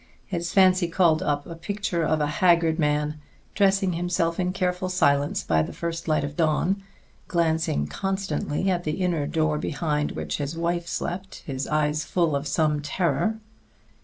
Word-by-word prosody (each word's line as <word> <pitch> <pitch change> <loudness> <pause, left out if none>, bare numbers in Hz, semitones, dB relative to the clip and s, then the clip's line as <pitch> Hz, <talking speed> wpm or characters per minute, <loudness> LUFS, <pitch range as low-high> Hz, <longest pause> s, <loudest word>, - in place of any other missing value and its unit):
His 170 -3 -3
fancy 185 -2 +5
called 165 -2 +3
up 145 -1 -1
a 170 - -7
picture 180 +1 -2
of 155 0 +1
a - - +3
haggard 170 0 +3
man 150 0 0 0.3
dressing 195 -2 +2
himself 170 0 0
in 180 0 +1
careful 185 0 -1
silence 145 -6 +2
by 80 -1 +2
the 80 - -4
first 165 0 -4
light 155 -2 +2
of 145 0 -4
dawn, 170 +5 +1 0.5
glancing 160 - +1
constantly 190 - -2
at 175 -1 -1
the 155 - -1
inner 165 -5 0
door 155 -1 0
behind 150 -1 -1
which - - -3
his 145 +2 -4
wife 170 0 -1
slept, 185 +3 -4
his 135 -2 -3
eyes 150 0 +1
full 170 -5 +1
of 140 +1 -2
some 150 0 +1
terror. 175 +8 0
165 Hz, 160 wpm, -25 LUFS, 150-180 Hz, 0.5 s, fancy